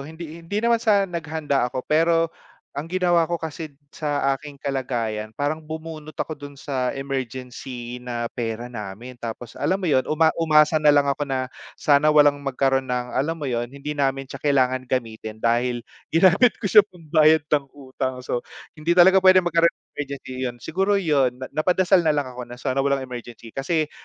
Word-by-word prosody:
hindi 160 +3 -9
hindi 170 +5 -5
naman 235 -1 +3
sa 205 -3 +3
naghanda 160 -7 -1
ako, 130 +1 -5
pero 165 +1 +2 0.4
ang 145 +3 -5
ginawa 175 -1 +2
ko 170 - -2
kasi 160 -2 -6 0.2
sa 145 -2 -1
aking 145 0 -10
kalagayan, 115 -6 -3
parang 145 +3 -1
bumunot 155 0 -8
ako - - -3
dun 145 0 -9
sa 135 -2 -2
emergency 125 -2 -5
na 120 -1 -4
pera 120 +1 -4
namin. 115 +3 -8
Tapos 115 0 -6
alam 160 +7 +2
mo 195 - -6
'yon, 135 -6 +2
uma 160 +1 +3
umasa 155 -1 +4
na 150 -1 +5
lang 145 -1 +5
ako 140 0 -1
na 130 -1 -1 0.3
sana 145 +1 +3
walang 145 -1 +5
magkaroon 135 -1 0
ng 125 0 -1
alam 155 +5 0
mo 155 - -6
'yon, 120 -3 -2
hindi 140 +3 -6
namin 135 -2 0
siya 130 - -10
kailangan 130 -3 +1
gamitin 110 -3 -3
dahil 120 +1 +1 0.2
ginamit 190 +8 +4
ko - - -14
siya 215 - +9
pambayad 155 -3 +3
ng 145 -2 +3
utang. 130 -2 -5
So, 120 - -1 0.4
hindi 165 +3 +1
talaga 185 +2 +7
puwede 185 0 +6
magkaroon 170 -1 +3
ng 170 - -1
emergency, 140 -2 -6
yun 120 -1 -5
siguro 195 +5 0
'yon, 145 -10 +2
na 130 - -6
napadasal 180 +3 +2
na 155 - +4
lang 145 - +1
ako 125 -1 -8
na 120 - -9
sana 130 +1 -2
walang 140 0 +1
emergency 120 -3 -9
kasi 155 +5 -1
145 Hz, 180 wpm, -23 LUFS, 125-160 Hz, 0.4 s, siya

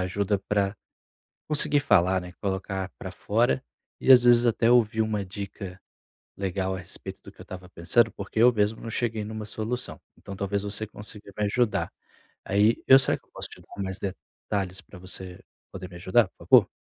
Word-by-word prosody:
ajuda 100 +2 0
para 100 0 +1 0.7
conseguir 150 -1 +5
falar, 95 -7 +3
né, 90 0 -9
colocar 95 -1 -3
para - - -7
fora, 65 0 +1 0.4
e 135 - +1
às 125 -1 +8
vezes 120 0 +6
até 115 0 +2
ouvir 110 -2 +3
uma 105 -2 -1
dica 95 -1 -8 0.6
legal 95 -1 -2
a - - -4
respeito 90 - -9
do - - -12
que - - -20
eu - - -7
estava 90 -1 -9
pensando, 110 +7 +2
porque 100 +2 -4
eu 125 +2 +7
mesmo 105 0 0
não 115 - -6
cheguei 115 -2 -2
numa 110 0 -6
solução, 110 +4 -4 0.2
então 100 - -9
talvez 100 0 -2
você 105 +1 -1
consiga 105 -1 -11
me 105 - +1
ajudar. 115 +2 0 0.5
Aí, 105 +4 +2
eu, 135 - +9
será 135 - +2
que - - -33
eu - - -37
posso - - -7
te - - -13
dar 100 - -8
mais 95 0 -4
detalhes 95 0 -4
pra 95 - -14
você 95 0 -5 0.3
poder 95 -1 -7
me 90 - -12
ajudar, 95 +5 +3
por - - -41
favor? - - +7
100 Hz, 190 wpm, -26 LUFS, 95-110 Hz, 0.7 s, eu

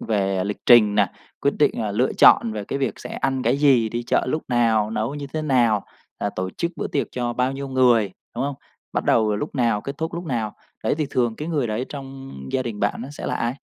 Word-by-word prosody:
về 95 -3 0
lịch 105 0 -3
trình 110 -4 +7
này, 105 -3 +3 0.3
quyết - - +1
định, - - +4
ờ, - - -2
lựa - - +1
chọn 110 - +6
về 105 -2 -4
cái 140 - -3
việc 135 - -1
sẽ - - -8
ăn 135 -1 -1
cái 120 +4 +2
gì, 130 -6 +4
đi 120 +2 -3
chợ 120 - +1
lúc 155 +4 -1
nào, 115 -3 +2
nấu 110 +6 -2
như 145 -1 -5
thế 155 - -1
nào, 120 -8 +2 0.3
ờ, 100 - -1
tổ 95 0 -2
chức 170 - -3
bữa - - -2
tiệc 140 - -1
cho 120 -1 -2
bao 125 +2 0
nhiêu 135 0 -5
người, 120 -6 +3 0.3
đúng 125 - 0
không? 140 0 -2 0.4
Bắt - - -1
đầu 110 -2 +3
lúc 145 - -4
nào, 115 -5 +1
kết 140 +4 -7
thúc 160 +1 -3
lúc 175 +1 -5
nào. 115 -7 -2 0.3
Đấy, - - +2
thì 150 - 0
thường 120 -3 0
cái 155 +2 -5
người 145 -7 0
đấy 110 +4 -2
trong 135 -1 -8 0.2
gia 130 - +1
đình 115 -4 -5
bạn 105 +3 0
nó 130 - -7
sẽ - - -6
là - - -1
ai? 120 +2 -1
120 Hz, 250 wpm, -23 LUFS, 110-135 Hz, 0.4 s, trình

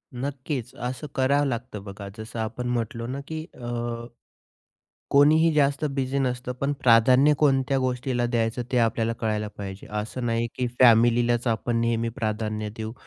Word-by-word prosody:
नक्कीच 130 -1 -4
असं 125 +5 -5
करावं 140 +2 +2
लागतं 120 -5 -4
बघा, 100 0 -8
जसं 110 +1 -7
आपण 115 +3 -3
म्हटलो 115 -1 -2
ना, 130 +3 -4
की 160 0 -5
अ, 120 -1 -4 1.1
कोणीही 155 +3 +5
जास्त 140 0 +2
बिझी 135 0 -1
नसतं, 125 -1 -1
पण 140 +1 +1
प्राधान्य 125 +5 +5
कोणत्या 135 -2 +2
गोष्टीला 125 -1 -1
द्यायचं 120 0 0
ते 125 - +3
आपल्याला 115 0 +1
कळायला 105 -1 -1
पाहिजे. 95 -1 -7
असं 105 +4 -4
नाही, 115 0 0
की 125 - -1
फॅमिलीलाच 120 0 +5
आपण 115 +1 0
नेहमी 115 0 0
प्राधान्य 110 -1 -2
देऊ. 110 0 -5
120 Hz, 145 wpm, -25 LUFS, 115-130 Hz, 1.1 s, कोणीही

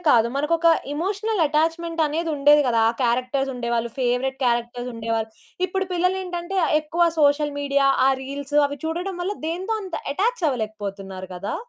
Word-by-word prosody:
కాదు. 235 -4 +5
మనకొక 325 +4 +1 0.3
emotional 395 +4 -1
attachment 330 +2 0
అనేదుండేది 295 -2 +3
కదా! 230 -2 +2
ఆ - - -5
క్యారెక్టర్స్ 255 +3 0
ఉండేవాళ్ళు. 235 -1 -1
ఫేవరైట్ 255 +2 0
క్యారెక్టర్స్ 240 +1 -1
ఉండేవాళ్ళు. 225 -1 -2 0.4
ఇప్పుడు 385 +1 -2
పిల్లలేంటంటే 365 0 -1
ఆహ్, - - +1
ఎక్కువ 330 +3 +1 0.2
సోషల్ 290 0 +3
మీడియా, 280 -1 +2 0.2
ఆ - - +6
రీల్స్ 280 +2 -6
అవి 285 0 -7
చూడడం 350 +4 -3
వల్ల, 400 +4 -2
దేనితో 375 +7 -2
అంత 370 -3 -7 0.2
అటాచ్ 430 +4 0
అవ్వలేకపోతున్నారు 200 -5 -5
కదా! 190 +3 -4
290 Hz, 145 wpm, -23 LUFS, 245-345 Hz, 0.4 s, ఆ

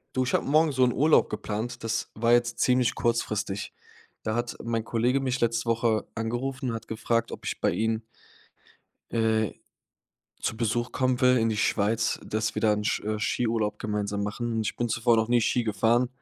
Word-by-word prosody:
Du, 130 - +2
ich 125 - -2
habe - - +2
morgen 155 +1 +4
so 130 -1 +2
'n 125 - +4
Urlaub 150 +5 +4
geplant, 110 +3 -4
das 115 0 -2
war 115 +2 +1
jetzt 120 0 +2
ziemlich 125 -2 +3
kurzfristig. 110 -4 -1 0.5
Da 110 - -1
hat 120 +1 -2
mein 115 -1 -1
Kollege 120 +4 +1
mich 130 -1 -1
letzte 115 0 +1
Woche 115 -1 +1
angerufen 125 +4 -2
und - - -3
hat 115 0 -8
gefragt, 115 +1 -1
ob - - -8
ich - - -4
bei - - +3
ihnen 110 0 0 1.1
äh, 110 -2 +1 0.9
zu 110 - -2
Besuch 120 +1 -1
kommen 130 -2 +1
will 125 0 +5
in 115 0 +2
die 110 - -1
Schweiz, 110 +2 +1
dass 110 +1 -2
wir - - -3
da 110 - +4
'n 105 0 -1
Sk 105 - -1
äh, 110 0 -1
Skiurlaub 110 -1 0
gemeinsam 105 -1 -2
machen. 115 +4 -3
Und 110 - 0
ich - - -3
bin 120 - -1
zuvor 120 +1 +2
noch 110 0 +1
nie 120 0 +4
Ski 120 +2 +1
gefahren, 115 +3 +2
115 Hz, 195 wpm, -27 LUFS, 110-120 Hz, 1.1 s, will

